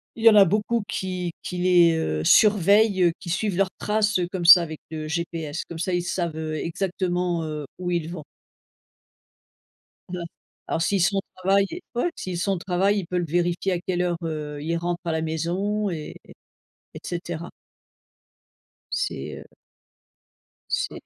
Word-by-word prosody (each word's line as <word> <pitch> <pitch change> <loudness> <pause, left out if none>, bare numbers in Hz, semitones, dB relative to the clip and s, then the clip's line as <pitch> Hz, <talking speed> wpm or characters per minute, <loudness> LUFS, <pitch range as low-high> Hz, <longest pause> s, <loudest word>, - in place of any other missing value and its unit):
il 225 - -6
y - - +11
en 220 - +6
a 200 - +9
beaucoup 210 +5 0
qui 180 -1 -3
qui 180 - -5
les, 175 -2 +5
heu, 80 - -1
surveillent, 200 - +5
qui 190 -4 -7
suivent 195 +1 -1
leurs 195 0 +2
traces, 215 -1 +1
heu, 175 - 0
comme 185 -2 -3
ça, 175 +1 +10
avec 160 -2 -5
le 155 -1 -5
GPS, 165 -2 -3
comme 170 - -8
ça 180 +2 -1
ils 175 - +1
savent, 170 -2 -2
heu, 155 -1 -3
exactement, 175 0 -1
heu, 150 -1 -4
où 180 -1 -3
ils 170 -2 -1
vont. 165 -4 -7 1.8
Ouais, 180 0 -5 0.5
alors, 165 - -1
s'ils 200 +2 +1
sont 200 +3 +2
au - - +2 0.2
travail 195 +2 +3 0.3
ouais, 245 +9 +1
s'ils 180 -2 -4
sont 195 +3 0
au 190 - -1
travail, 190 +3 +1
il 190 - -3
peut 180 +2 -1
le 175 - 0
vérifier 175 +3 0
à 180 - 0
quelle 180 0 -1
heure, 175 -1 0
heu, 150 -2 -4
il 165 +2 -1
rentre 175 +1 -2
à 165 - 0
la 160 0 -1
maison 185 +6 -1
et 155 -3 -6 0.8
et - - -8
cetera. 170 -1 -5 1.4
C'est - - -3
heu - - -11 1.3
c'est - - -1
175 Hz, 170 wpm, -24 LUFS, 165-195 Hz, 1.8 s, y